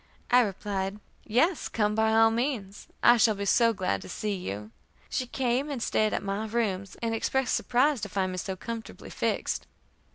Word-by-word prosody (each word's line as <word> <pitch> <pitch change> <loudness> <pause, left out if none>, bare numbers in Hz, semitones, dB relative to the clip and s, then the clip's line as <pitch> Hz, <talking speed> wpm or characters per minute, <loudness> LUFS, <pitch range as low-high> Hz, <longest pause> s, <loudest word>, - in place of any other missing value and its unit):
I 250 - +7
replied, 200 -1 -2 0.3
"Yes, 290 - +1
come 210 -2 +1
by 220 0 +2
all 225 0 +5
means. 225 -5 -3 0.2
I 240 0 +7
shall 220 -1 +4
be 200 0 -4
so 230 +3 +4
glad 185 - -1
to - - -10
see 210 -1 -2
you." 105 - -5 0.4
She 255 - -1
came 255 +3 0
and 280 -4 -3
stayed 215 -1 +1
at - - -2
my 200 +2 -2
rooms, 200 -4 -2
and 230 -1 0
expressed 260 +3 0
surprise 260 +1 +2
to 205 - -4
find 190 -1 -1
me 185 - -4
so 190 +1 -4
comfortably 230 +4 -7
fixed. - - -1
220 Hz, 185 wpm, -28 LUFS, 195-240 Hz, 0.4 s, I